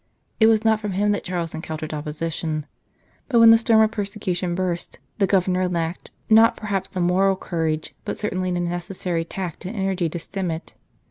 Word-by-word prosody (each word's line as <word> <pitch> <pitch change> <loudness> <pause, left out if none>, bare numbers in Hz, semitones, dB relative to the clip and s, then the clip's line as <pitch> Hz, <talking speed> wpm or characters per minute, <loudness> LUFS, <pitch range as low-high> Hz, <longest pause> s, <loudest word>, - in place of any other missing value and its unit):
It 220 - +6
was 225 0 +3
not 220 -1 +4
from 210 -2 -4
him 205 +2 +2
that 205 - -1
Charles 175 -3 -3
encountered 155 -1 -5
opposition; 155 0 -3 0.6
but 245 - +3
when 230 0 +9
the 225 - +8
storm 225 -1 +4
of 220 0 +3
persecution 190 -4 -2
burst 180 -2 -3 0.2
the 195 - +3
Governor 185 -1 +2
lacked, 170 0 -3 0.2
not 225 +1 +6
perhaps 195 -3 -2
the 185 - -5
moral 185 +2 +3
courage, 160 -4 -2
but - - -4
certainly 185 -3 -2
the 175 0 -1
necessary 175 0 -2
tact 175 0 -6
and 190 +6 -5
energy 190 -4 0
to 170 - -5
stem 185 +2 -4
it. 160 +1 -5
185 Hz, 185 wpm, -23 LUFS, 170-205 Hz, 0.6 s, when